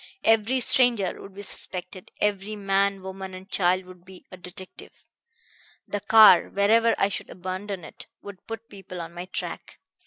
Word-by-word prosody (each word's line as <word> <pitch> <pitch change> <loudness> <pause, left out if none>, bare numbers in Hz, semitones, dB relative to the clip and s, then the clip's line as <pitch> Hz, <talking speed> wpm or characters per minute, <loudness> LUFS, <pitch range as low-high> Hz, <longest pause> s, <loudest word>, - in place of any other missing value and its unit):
Every 225 +3 +3
stranger 235 -7 +3
would 195 - -12
be 200 - -8
suspected; 180 -1 -2
every 210 0 -1
man, 195 -1 0
woman 190 0 -7
and 185 +1 -11
child 185 -1 +1
would 180 -1 -15
be 185 0 -15
a - - -8
detective. 185 +1 -11 0.8
The 205 - -3
car, 210 -3 +7
wherever 225 +3 +3
I 195 - +3
should 200 - -6
abandon 185 +1 -6
it, - - -11 0.2
would 200 -2 -11
put 225 0 -7
people 190 -4 -10
on 165 0 -7
my 175 +1 -7
track. 185 - -7
195 Hz, 160 wpm, -25 LUFS, 185-205 Hz, 0.8 s, car